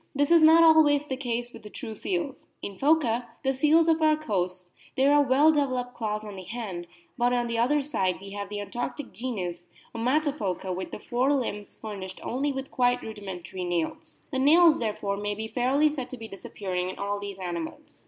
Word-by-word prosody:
This 285 Hz, +2 st, +1 dB
is 335 Hz, -1 st, +7 dB
not 320 Hz, +1 st, +8 dB
always 305 Hz, -3 st, +6 dB
the 265 Hz, -, -3 dB
case 245 Hz, -2 st, -2 dB
with -, -, -11 dB
the 210 Hz, -, -10 dB
true 225 Hz, 0 st, -7 dB
seals; 320 Hz, -, -4 dB, 0.2 s
in 200 Hz, -, -5 dB
Phoca, 250 Hz, -4 st, +2 dB, 0.2 s
the 270 Hz, 0 st, +2 dB
seals 310 Hz, +5 st, +4 dB
of 325 Hz, -1 st, +3 dB
our 310 Hz, -1 st, +4 dB
coasts, 180 Hz, -9 st, -3 dB, 0.3 s
there 275 Hz, +2 st, +5 dB
are 290 Hz, -, +6 dB
well 285 Hz, +3 st, +5 dB
developed 255 Hz, -4 st, -1 dB
claws 215 Hz, -2 st, -3 dB
on 205 Hz, -2 st, -8 dB
the -, -, -6 dB
hand, 190 Hz, -3 st, -6 dB, 0.3 s
but 245 Hz, +1 st, +3 dB
on 245 Hz, -1 st, +1 dB
the 235 Hz, -1 st, -2 dB
other 285 Hz, +5 st, +2 dB
side 190 Hz, -10 st, -1 dB
we 195 Hz, +1 st, -10 dB
have 200 Hz, 0 st, -5 dB
the 205 Hz, 0 st, -4 dB
Antarctic 245 Hz, +6 st, -5 dB
genus, 185 Hz, -6 st, -4 dB, 0.3 s
Ommato 275 Hz, +6 st, +1 dB
phoca, 185 Hz, -, -3 dB
with 185 Hz, -, -5 dB
the -, -, -6 dB
fore 250 Hz, +5 st, 0 dB
limbs 225 Hz, -7 st, -2 dB
furnished 195 Hz, -3 st, -7 dB
only 275 Hz, +4 st, -1 dB
with 270 Hz, 0 st, -5 dB
quite 245 Hz, -1 st, +2 dB
rudimentary 190 Hz, -4 st, -7 dB
nails. 175 Hz, -2 st, -3 dB
The 265 Hz, -, -1 dB
nails, 320 Hz, +3 st, +6 dB
therefore, 205 Hz, -3 st, -2 dB
may 205 Hz, 0 st, -2 dB
be 220 Hz, +1 st, -4 dB
fairly 260 Hz, +6 st, +2 dB
said 265 Hz, -4 st, -5 dB
to 255 Hz, -, -7 dB
be 225 Hz, -1 st, -8 dB
disappearing 185 Hz, -2 st, -4 dB
in 185 Hz, -, -7 dB
all 200 Hz, 0 st, -2 dB
these 200 Hz, -1 st, -6 dB
animals. 175 Hz, -3 st, -6 dB
240 Hz, 200 wpm, -27 LUFS, 200-285 Hz, 0.3 s, not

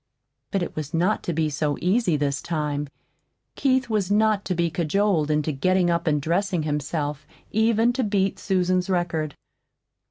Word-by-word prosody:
But 195 Hz, -3 st, 0 dB
it -, -, -6 dB
was 155 Hz, 0 st, -4 dB
not 180 Hz, +6 st, +1 dB
to -, -, -1 dB
be 160 Hz, -1 st, 0 dB
so 145 Hz, 0 st, -1 dB
easy 185 Hz, -3 st, +2 dB
this 140 Hz, -2 st, -1 dB
time. 150 Hz, -3 st, -2 dB, 0.7 s
Keith 260 Hz, -1 st, +1 dB
was 210 Hz, -5 st, 0 dB
not 210 Hz, 0 st, +3 dB
to 185 Hz, -, -1 dB
be 170 Hz, -1 st, 0 dB
cajoled 170 Hz, -1 st, +1 dB
into 150 Hz, 0 st, +1 dB
getting 180 Hz, +5 st, +2 dB
up 170 Hz, +1 st, -1 dB
and 150 Hz, -2 st, +3 dB
dressing 175 Hz, +3 st, 0 dB
himself 150 Hz, -1 st, -3 dB, 0.2 s
even 225 Hz, +2 st, +3 dB
to 255 Hz, +1 st, 0 dB
beat 200 Hz, -2 st, 0 dB
Susan's 185 Hz, -1 st, +1 dB
record. 170 Hz, -5 st, -1 dB
175 Hz, 160 wpm, -24 LUFS, 150-200 Hz, 0.7 s, not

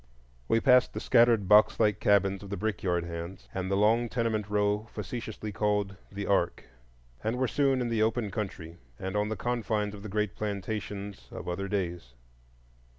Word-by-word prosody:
We 115 Hz, -, +3 dB
passed 125 Hz, 0 st, +5 dB
the -, -, -2 dB
scattered 115 Hz, -4 st, +4 dB
box 105 Hz, +2 st, +6 dB
like 105 Hz, -1 st, +3 dB
cabins 100 Hz, -1 st, +3 dB
of 100 Hz, -, -9 dB
the 100 Hz, -, -3 dB
brickyard 90 Hz, -5 st, -1 dB
hands, 85 Hz, +2 st, -7 dB
and 95 Hz, 0 st, -3 dB
the 100 Hz, -, +1 dB
long 115 Hz, +3 st, +3 dB
tenement 110 Hz, -3 st, -1 dB
row 105 Hz, +1 st, +1 dB
facetiously 110 Hz, -4 st, -5 dB
called 105 Hz, -1 st, 0 dB, 0.2 s
"The 100 Hz, 0 st, -4 dB
Ark," 90 Hz, -3 st, +1 dB, 0.6 s
and 115 Hz, +3 st, -1 dB
were 130 Hz, 0 st, +1 dB
soon 135 Hz, -1 st, +2 dB
in 120 Hz, -, -1 dB
the 115 Hz, -2 st, +1 dB
open 110 Hz, -1 st, +1 dB
country, 90 Hz, -6 st, -5 dB, 0.2 s
and 95 Hz, +1 st, -4 dB
on 105 Hz, 0 st, +1 dB
the 110 Hz, -, -2 dB
confines 110 Hz, -2 st, -1 dB
of 100 Hz, -, -9 dB
the 105 Hz, -, -7 dB
great 105 Hz, 0 st, -1 dB
plantations 100 Hz, -, -4 dB
of -, -, -8 dB
other 95 Hz, +3 st, -2 dB
days. 85 Hz, -10 st, -3 dB
105 Hz, 175 wpm, -29 LUFS, 95-110 Hz, 0.6 s, box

